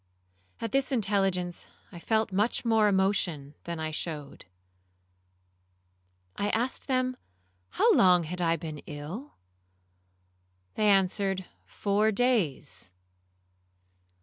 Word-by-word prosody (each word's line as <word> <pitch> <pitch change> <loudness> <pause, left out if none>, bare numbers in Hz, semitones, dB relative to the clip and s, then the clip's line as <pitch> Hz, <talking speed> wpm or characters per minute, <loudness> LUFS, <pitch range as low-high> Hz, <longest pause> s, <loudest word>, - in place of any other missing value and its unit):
At 230 - -4
this 270 +2 +1
intelligence 195 -6 0 0.2
I 170 - -9
felt 220 +3 0
much 210 +6 0
more 220 -2 +4
emotion 185 -7 0
than 170 -1 -4
I 155 0 -3
showed. 150 -2 -5 1.9
I 205 - -1
asked 240 +4 -1
them 255 -1 0 0.5
how - - +3
long 180 -2 +5
I - - -8
had 170 -2 0
been 155 -2 -6
ill? 160 - -7 1.4
They 215 -1 +2
answered, 195 -1 +2 0.2
Four 210 +2 +1
days. 185 - 0
195 Hz, 100 wpm, -28 LUFS, 170-220 Hz, 1.9 s, long